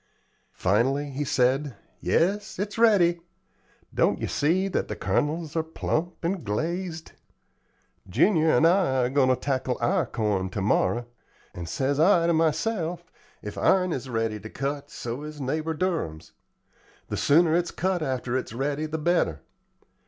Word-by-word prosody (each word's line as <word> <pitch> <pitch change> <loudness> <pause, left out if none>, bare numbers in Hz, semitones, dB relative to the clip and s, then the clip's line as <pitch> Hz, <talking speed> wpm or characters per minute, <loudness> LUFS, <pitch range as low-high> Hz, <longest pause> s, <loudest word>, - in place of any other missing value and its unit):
Finally 135 +9 +1
he 140 +2 -2
said: 130 0 +1 0.2
"Yes, 205 +5 0
it's 205 +3 -4
ready. 185 -7 +4 0.7
Don't - - +2
yer - - -2
see 180 +6 +1
that 195 - -1
the - - -4
kernels 150 - -1
are 165 - +2
plump 160 +2 -3
and 180 0 -1
glazed? 165 - -3 1.0
Junior 160 - +3
and 160 - +4
I 165 -8 +3
are - - 0
going 135 -2 +3
to 130 - +4
tackle 130 -1 -2
our 120 - +1
corn 100 -4 -1
ter 95 - -4
morrow, 120 +4 +1 0.5
and 85 -2 -7
says 140 - -1
I 170 0 +5
to 170 - +3
myself, 170 +1 -1 0.3
'If 105 - -6
ourn 185 -2 +3
is 130 0 -5
ready 115 -2 -1
to 110 +2 -9
cut, 140 +3 -4
so 120 +3 -5
is 150 0 -8
neighbor 155 +4 -2
Durham's,' 160 - -2 0.8
The - - -2
sooner 160 +2 +4
it's 175 0 +1
cut 185 -1 -1
after 130 -4 -2
it's 130 -3 -3
ready, 145 +5 -2
the 155 +1 -3
better. 155 - +1
150 Hz, 150 wpm, -26 LUFS, 125-170 Hz, 1.0 s, I